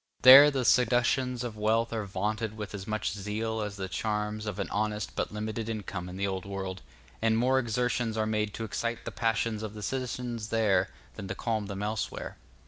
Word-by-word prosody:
There, 135 +3 +11
the 135 -3 -1
seductions 125 0 +3
of 120 -3 -5
wealth 110 +2 +1
are 110 -3 -2
vaunted 110 +3 -2
with 105 -1 -6
as 100 -1 -6
much 110 -1 -1
zeal 110 +2 -3
as 105 -1 -4
the 95 -1 -4
charms 105 +1 -2
of 105 -2 -3
an 100 - -2
honest 105 0 -2
but - - -2
limited 110 +1 -4
income 100 -5 -4
in 90 - -7
the 100 - 0
Old 95 -2 -2
World, 95 -1 -5 0.4
and 110 0 +3
more 130 +3 +3
exertions 120 -1 -1
are 110 - +1
made 105 -1 0
to 115 - -4
excite 115 +2 -3
the - - -4
passions 115 -1 0
of 110 -1 -6
the 105 - -7
citizens 125 -3 -3
there 110 -3 +2 0.2
than 95 - -7
to - - -4
calm 110 -3 -2
them 100 0 -4
elsewhere. 105 0 -3
110 Hz, 200 wpm, -29 LUFS, 105-115 Hz, 0.4 s, There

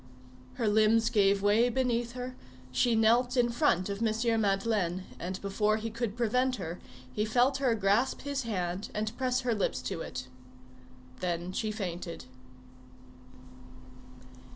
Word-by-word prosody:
Her 230 - -1
limbs 220 +2 +4
gave 200 -3 +3
way 215 +4 +4
beneath 240 -1 0
her, 250 0 -6 0.4
she 235 - +2
knelt 240 +3 +3
in 240 -1 +4
front 235 - +2
of 200 +1 -4
M. 225 0 +1
Madeleine, 195 -3 0 0.2
and 185 +2 -4
before 210 +2 +1
he 225 +1 -4
could 230 -1 -3
prevent 250 +2 +1
her 175 -4 -6 0.3
he 210 - 0
felt 245 +5 +2
her 260 -4 +2
grasp 210 +5 +1
his 280 -1 -2
hand 185 -4 -3
and 215 +2 -2
press 255 0 0
her 245 -2 0
lips 210 - -1
to 185 -4 -3
it. 125 -4 -5 0.9
Then 175 0 -2
she 215 +3 -2
fainted. 175 - -5
220 Hz, 140 wpm, -30 LUFS, 195-240 Hz, 0.9 s, limbs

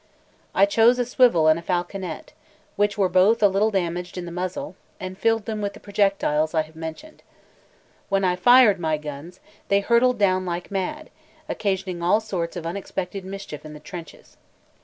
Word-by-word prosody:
I 195 - +6
chose 225 +4 +4
a 245 - 0
swivel 240 -10 +4
and 155 +1 +4
a - - -9
falconet, 175 -1 -4 0.4
which 205 0 +1
were 195 -2 +3
both 190 +5 +3
a - - +8
little 200 +3 +2
damaged 180 -2 -3
in 180 - -4
the 170 - -7
muzzle, 180 +1 -4 0.2
and 185 0 -6
filled 225 +1 +1
them 215 -2 -4
with 200 -1 -2
the - - -12
projectiles 195 -6 0
I 160 - +3
have 155 +1 -17
mentioned. 160 - -8 0.9
When 195 -1 +1
I 180 -1 +2
fired 235 0 +6
my 160 -2 0
guns, 150 +3 -9 0.3
they 200 - +3
hurtled 235 +3 +3
down 185 -2 +2
like 175 0 -5
mad, 200 +11 -4 0.4
occasioning 190 -3 -2
all 180 +5 +3
sorts 185 -6 -4
of 170 -2 -6
unexpected 190 +1 -4
mischief 190 -5 -8
in 155 -1 -10
the 150 - -10
trenches. 170 0 -11
185 Hz, 180 wpm, -23 LUFS, 170-205 Hz, 0.9 s, a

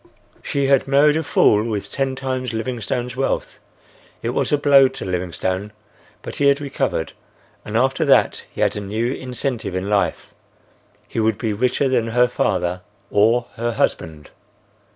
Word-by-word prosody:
She 140 -1 -1
had 135 -1 +3
married 145 +2 +4
a 160 - +1
fool 105 -8 +3
with 110 -3 -4
ten 135 -1 -1
times 130 -2 -3
Livingstone's 120 +1 -3
wealth. 135 +1 -2 0.6
It - - -1
was - - -1
a 150 - +4
blow 140 -2 +6
to 135 +1 -7
Livingstone, 95 +2 -2 0.5
but - - -6
he 140 - +3
had 140 0 +4
recovered, 135 - -2 0.5
and 105 +1 -3
after 130 +2 +2
that - - +3
he - - -7
had - - +2
a 105 - -3
new 110 +5 -2
incentive 125 -6 -3
in 95 +3 -3
life; 100 -1 -1 0.7
he - - -4
would 110 -1 +1
be 110 -3 -2
richer 125 +5 +1
than 125 -3 +1
her 125 +2 +3
father 90 -6 -1 0.3
or 115 +4 +3
her 120 +1 -1
husband. 80 -8 -2
120 Hz, 160 wpm, -21 LUFS, 105-135 Hz, 0.7 s, blow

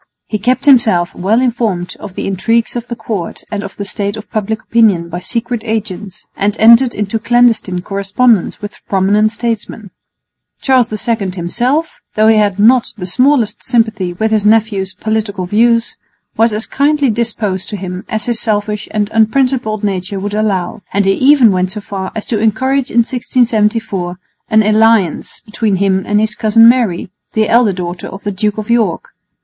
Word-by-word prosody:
He 215 - -3
kept 250 +6 0
himself 220 -11 +4
well 205 +6 +1
informed 225 -8 -1
of 185 - -9
the - - -4
intrigues 225 +6 0
of 240 0 -4
the 235 - -5
court 200 -8 -5
and 210 -2 -3
of 195 - -9
the 200 - -4
state 200 +1 -3
of 215 - -11
public 220 -1 -3
opinion 205 -8 +2
by 175 +1 -5
secret 235 +4 -3
agents, 210 -4 -5
and 205 +1 -1
entered 235 +3 +5
into 210 +2 -2
clandestine 225 -6 +2
correspondence 200 +2 0
with 205 - -8
prominent 205 +3 +2
statesmen. 225 -3 -4 0.7
Charles 255 -4 +2 0.2
II 220 -5 0
himself, 245 - -1 0.2
though 215 - +3
he 220 0 +5
had 205 -2 +1
not 235 +4 +3
the 180 - -5
smallest 240 +2 +1
sympathy 220 -6 0
with 220 +5 -1
his 215 -2 +1
nephew's 210 -3 +1
political 210 -2 -2
views, 230 +4 +1 0.4
was 225 +1 +2
as 215 +2 -1
kindly 285 -2 +1
disposed 215 -4 -2
to 205 - -5
him 185 -1 -6
as 220 -1 -2
his 235 -2 0
selfish 210 -1 -1
and 210 -1 -1
unprincipled 225 -1 +1
nature 195 -1 -2
would 205 +1 -4
allow, 205 -2 -1
and 200 0 +1
he 195 - +3
even 260 -2 +4
went 185 0 -1
so 210 - -5
far 195 -2 -6
as 220 - -4
to 220 - -1
encourage 260 +5 0
in 235 - +3
1674 220 -7 -1 0.3
an 220 -1 +4
alliance 215 -4 +1
between 210 -2 -2
him 190 0 +1
and 210 0 +2
his 215 0 0
cousin 225 +2 +4
Mary, 230 -8 +1 0.2
the 220 -1 +1
elder 235 -2 +3
daughter 175 -1 -5
of 195 - -10
the 205 - -2
Duke 210 +2 -2
of 215 -1 -5
York. 220 -8 0
215 Hz, 175 wpm, -14 LUFS, 195-230 Hz, 0.7 s, entered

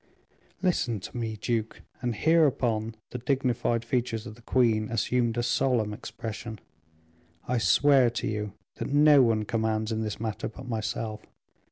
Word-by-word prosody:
'" - - -35
"Listen 125 - +1
to 95 - -9
me, 115 -2 -3
duke," 115 -1 -2 0.2
and 120 -2 -1
hereupon 120 -8 +2 0.2
the 125 - -4
dignified 120 -2 0
features 115 -2 -1
of 115 - -7
the 120 - -17
queen 115 -3 +2
assumed 120 0 0
a 120 - +1
solemn 120 -3 +1
expression. 115 -2 -6 0.9
"I 125 -1 +1
swear 135 +1 +5
to 120 - -3
you 105 -2 -3 0.2
that - - -4
no 145 -1 +7
one 110 -3 +2
commands 110 0 -1
in 110 0 -1
this 110 -1 -3
matter 110 -1 -3
but 125 +3 -10
myself. 110 -1 -3
115 Hz, 155 wpm, -28 LUFS, 110-125 Hz, 0.9 s, no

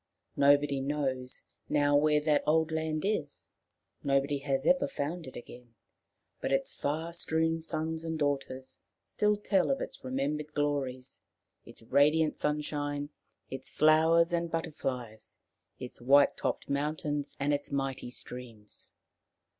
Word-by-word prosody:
Nobody 140 -1 +4
knows 135 -3 -2 0.3
now 145 -1 +3
where 150 +1 +4
that 150 -1 +2
old 160 +1 +3
land 160 -1 -1
is, 160 -9 -2 0.5
nobody 140 0 +1
has 135 0 -1
ever 275 - +4
found 165 - -4
it 130 - -10
again, 120 -1 -11 0.6
but - - -2
its - - +1
far 160 +4 -3
strewn 160 -1 0
sons 160 0 -2
and 160 -1 -3
daughters 135 -3 -2 0.2
still 210 0 +1
tell 195 -2 +1
of 275 - +1
its - - -7
remembered 145 +4 -2
glories, 135 -3 -2 0.5
its - - -10
radiant 150 +5 +3
sunshine, 145 -1 -2 0.4
its 130 0 -4
flowers 160 +2 +4
and 170 0 0
butterflies, 130 -9 -4 0.4
its 125 -2 -8
white 140 +3 +5
topped - - -2
mountains 145 0 -2
and 145 +1 +1
its 145 0 -2
mighty 135 -2 -2
streams. 120 -4 -8
145 Hz, 130 wpm, -30 LUFS, 135-160 Hz, 0.6 s, white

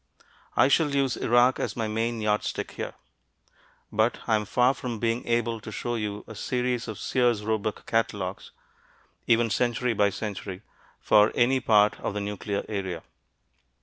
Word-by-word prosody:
I - - +5
shall 145 0 +2
use 135 -3 +1
Iraq 120 +2 +3
as - - -2
my 115 -2 -1
main 115 +1 -1
yard 105 0 +1
stick - - -4
here. - - -6 1.0
But 110 +3 +2
I 115 - +1
am 105 -1 -1
far 125 +5 +3
from 125 -3 -5
being 115 +2 -1
able 115 -1 0
to 110 - -8
show 120 +3 -3
you 105 -2 -3
a - - -9
series 125 +2 -2
of 110 -3 -5
Sears 120 -5 +1
Roebuck 110 -1 -2
catalogues, 100 -4 -2 0.8
even 115 -1 +3
century 120 0 +1
by 100 -1 +3
century, 100 -1 -6 0.4
for 105 0 +5
any 130 +2 +3
part 105 -3 +3
of - - -3
the - - -1
nuclear 100 0 -3
area. 95 -5 -4
115 Hz, 160 wpm, -26 LUFS, 105-120 Hz, 1.0 s, I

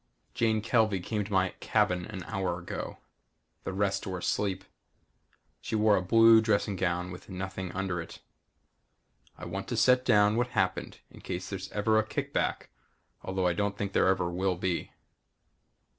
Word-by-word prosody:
Jane 110 -2 +1
Kelvey 110 -4 +2
came 105 +4 -2
to 100 - -10
my 95 -1 +3
cabin 90 -1 +1
an 95 -4 -7
hour 95 -5 -2
ago. 85 - -6 0.7
The - - -2
rest 100 0 -1
were 95 -1 -3
asleep. 95 +1 -1 1.0
She - - -4
wore 105 -1 +4
a 95 - +1
blue 115 +4 +6
dressing 105 -2 +1
gown 90 0 -1
with 90 +2 -11
nothing 95 -1 -5
under 90 -2 -2
it. 80 - -10 1.2
I - - -8
want - - -5
to - - -3
set 125 0 +4
down 105 -2 +4
what 120 0 +1
happened 100 -7 -2
in - - -14
case 90 +1 -5
there's 95 0 -5
ever 110 +1 +2
a - - +2
kickback 110 - -2 0.5
although 95 -1 -2
I 90 - +3
don't 100 +2 -1
think 100 -1 -3
there - - +3
ever 95 -2 +2
will 90 +2 0
be. 90 -1 -2
95 Hz, 165 wpm, -29 LUFS, 90-110 Hz, 1.2 s, blue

